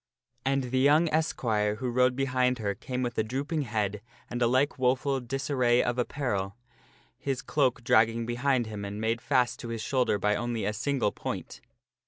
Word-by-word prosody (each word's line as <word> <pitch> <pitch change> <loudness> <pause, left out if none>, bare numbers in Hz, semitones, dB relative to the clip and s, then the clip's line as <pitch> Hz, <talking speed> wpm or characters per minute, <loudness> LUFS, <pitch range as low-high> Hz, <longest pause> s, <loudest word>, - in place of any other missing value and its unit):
And 135 -2 0
the 130 - +2
young 150 +5 +5
esquire 110 -9 0
who 125 +2 -3
rode 125 +1 +3
behind 130 -1 +1
her 105 -3 -1
came 125 +4 -4
with 120 -1 -3
a - - +3
drooping 140 +7 -2
head 105 -5 -2 0.3
and 120 0 -3
a 120 - +4
like 130 +3 +1
woful 130 +2 +1
disarray 125 -1 +1
of 120 +1 -1
apparel, 115 -7 -2 0.6
his 135 -2 -2
cloak 130 -5 +1
drag 110 -1 +5
ging 115 0 -4
behind 120 +1 +1
him 105 -2 -6
and 100 +1 -5
made 115 +1 0
fast 125 -2 +1
to - - -6
his 115 -2 -4
shoulder 125 -4 +1
by 105 +1 +1
only 120 -1 -2
a 105 - 0
single 120 0 0
point. - - -6
125 Hz, 185 wpm, -28 LUFS, 110-135 Hz, 0.6 s, young